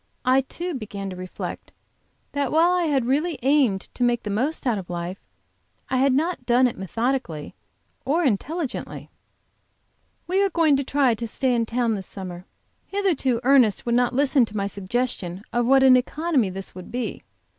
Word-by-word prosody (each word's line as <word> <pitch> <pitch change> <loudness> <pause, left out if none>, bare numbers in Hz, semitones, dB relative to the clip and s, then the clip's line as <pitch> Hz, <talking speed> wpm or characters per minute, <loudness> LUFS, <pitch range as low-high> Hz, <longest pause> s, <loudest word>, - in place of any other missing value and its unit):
I 260 +1 +4
too, 345 +6 -5
began 200 -6 -5
to - - -6
reflect, 185 0 -7 0.6
that 285 -2 -1
while 330 +3 +4
I 360 -1 +2
had 275 -6 +1
really 295 +5 0
aimed 265 -8 +3
to 250 - -2
make 240 -1 +1
the 210 - -3
most 265 +11 -1
out 235 -5 +1
of 180 - -10
life, 175 +2 -4 0.7
I 260 - +2
had 270 +1 +4
not 320 +7 0
done 245 +1 +4
it 245 - 0
methodically 190 - -3 0.5
or 310 +7 +1
intelligently. 285 - -2 1.1
We 375 +3 +1
are 395 - +2
going 325 -4 +3
to 275 - -1
try 270 -2 +2
to 230 +1 -4
stay 255 +3 0
in 230 -1 0
town 235 -1 0
this 195 -3 -5
summer. 185 -2 -8 0.4
Hitherto 325 -12 0
Ernest 250 -5 +4
would 235 - 0
not 245 0 +2
listen 275 -1 +4
to 215 -1 -8
my 200 - 0
suggestion 200 -2 -3
of 240 0 +1
what 270 +1 +5
an 260 -1 +8
economy 270 - +1
this 190 +1 -6
would 185 0 -10
be. 245 0 -3
250 Hz, 175 wpm, -24 LUFS, 205-280 Hz, 1.1 s, an